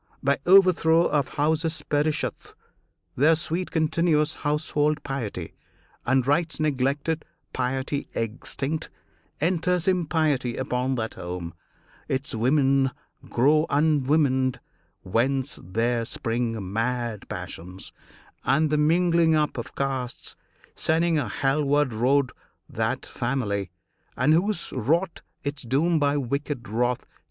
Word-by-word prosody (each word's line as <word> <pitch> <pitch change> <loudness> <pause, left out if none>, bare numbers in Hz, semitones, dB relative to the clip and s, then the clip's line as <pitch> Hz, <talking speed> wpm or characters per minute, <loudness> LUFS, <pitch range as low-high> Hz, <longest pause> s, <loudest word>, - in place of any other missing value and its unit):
By 140 +1 +2
overthrow 175 -3 +6
of 145 -3 +1
houses 160 +2 0
perisheth 150 +1 -1 0.6
Their 155 +5 +5
sweet 170 +3 -2
continuous 160 -1 +2
household 150 0 0
piety, 110 - -4 0.5
And 130 0 +3
rites 160 +4 +1
neglected, 145 +2 0 0.3
piety 130 +2 -2
extinct 135 +6 -3 0.5
Enters 180 +2 +1
impiety 155 -8 +1
upon 130 0 -1
that 110 -2 -3
home; 85 -1 -6 0.5
Its 135 +2 -2
women 135 +3 +3 0.4
grow 150 +6 +3
unwomaned, 140 -3 +2 0.4
whence 130 +8 0
there 115 +5 0
spring 115 -4 -3
Mad 115 -1 -2
passions, 90 +3 -7 0.5
and 155 +1 +2
the 150 - +2
mingling 165 +1 +3
up 150 -1 +1
of 120 - -6
castes, 135 -3 -3 0.4
Sending 165 0 +2
a - - -2
Hell 140 +2 +1
ward 145 -2 +2
road 130 +4 +2 0.4
that - - -2
family, 105 -7 -2 0.5
And 130 +5 +4
whoso 175 -3 0
wrought 165 - 0 0.2
its 145 -1 -4
doom 155 +7 +1
by 145 0 +2
wicked 140 -1 -3
wrath. 120 +3 0
140 Hz, 110 wpm, -25 LUFS, 125-155 Hz, 0.6 s, overthrow